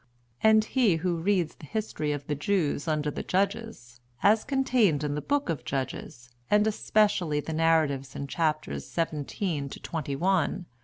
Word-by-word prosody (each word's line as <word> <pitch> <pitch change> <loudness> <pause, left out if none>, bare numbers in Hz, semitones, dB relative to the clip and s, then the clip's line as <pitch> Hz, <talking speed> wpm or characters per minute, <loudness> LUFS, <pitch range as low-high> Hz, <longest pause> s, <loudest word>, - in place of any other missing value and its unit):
And 220 0 +5
he 230 -7 +3
who 170 +1 -1
reads 180 -1 +1
the 150 - -13
history 215 -8 -2
of 145 -1 -4
the 150 - -2
Jews 150 -1 0
under 150 -1 0
the - - -4
Judges, 195 - -2 0.2
as 215 +2 +5
contained 245 - +2
in 145 -1 -1
the 150 - -2
Book 285 - 0
of 160 -5 -2
Judges, 120 -2 -5 0.2
and 210 0 +4
especially 205 -7 +2
the 160 +2 -4
narratives 155 -4 +1
in 140 - -4
chapters 155 +1 -1
xvii. 155 -4 -2 0.4
to - - -8
xxi. 165 +4 -1
165 Hz, 155 wpm, -28 LUFS, 145-205 Hz, 0.4 s, And